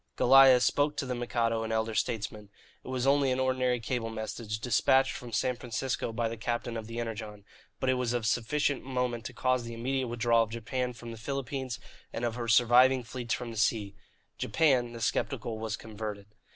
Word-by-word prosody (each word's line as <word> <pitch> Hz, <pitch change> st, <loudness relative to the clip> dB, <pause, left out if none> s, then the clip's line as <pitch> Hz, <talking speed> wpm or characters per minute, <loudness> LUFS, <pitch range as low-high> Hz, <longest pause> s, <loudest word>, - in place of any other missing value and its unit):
Goliah 135 Hz, 0 st, +7 dB
spoke 145 Hz, +4 st, +1 dB
to -, -, -1 dB
the 130 Hz, -, -2 dB
Mikado 120 Hz, -2 st, 0 dB
and 110 Hz, 0 st, -3 dB
the -, -, +1 dB
Elder 110 Hz, 0 st, -1 dB
Statesmen. 105 Hz, 0 st, -2 dB, 0.3 s
It -, -, -13 dB
was 130 Hz, -1 st, -2 dB
only 140 Hz, 0 st, +4 dB
an 130 Hz, -, 0 dB
ordinary 130 Hz, -1 st, +1 dB
cable 115 Hz, 0 st, -2 dB
message, 110 Hz, -1 st, -4 dB
despatched 130 Hz, +3 st, +3 dB
from 120 Hz, -1 st, -8 dB
San 125 Hz, +3 st, 0 dB
Francisco 125 Hz, 0 st, -3 dB
by 115 Hz, +1 st, -1 dB
the 115 Hz, +1 st, -5 dB
captain 120 Hz, +1 st, -3 dB
of 110 Hz, -1 st, -5 dB
the 115 Hz, +1 st, -5 dB
Energon, 110 Hz, -3 st, -6 dB, 0.3 s
but 130 Hz, -, -2 dB
it 130 Hz, -, +4 dB
was 125 Hz, -2 st, -1 dB
of 120 Hz, -2 st, -1 dB
sufficient 135 Hz, +5 st, 0 dB
moment 125 Hz, -3 st, -2 dB
to -, -, -6 dB
cause 130 Hz, -1 st, +1 dB
the 115 Hz, 0 st, -7 dB
immediate 130 Hz, +2 st, -1 dB
withdrawal 115 Hz, 0 st, +2 dB
of 115 Hz, -, 0 dB
Japan 125 Hz, +2 st, -3 dB
from 120 Hz, 0 st, -9 dB
the 115 Hz, -, -8 dB
Philippines 135 Hz, 0 st, -4 dB, 0.3 s
and 120 Hz, -, -3 dB
of 120 Hz, -, -1 dB
her 120 Hz, 0 st, -4 dB
surviving 125 Hz, +3 st, +5 dB
fleets 120 Hz, 0 st, -3 dB
from 120 Hz, -2 st, -6 dB
the 115 Hz, -, -8 dB
sea. 105 Hz, -2 st, +1 dB, 0.5 s
Japan 130 Hz, -7 st, +2 dB
the 115 Hz, -, -8 dB
sceptical 115 Hz, -1 st, -1 dB
was 110 Hz, 0 st, -3 dB
converted. 105 Hz, -2 st, -6 dB
120 Hz, 200 wpm, -30 LUFS, 115-130 Hz, 0.5 s, Goliah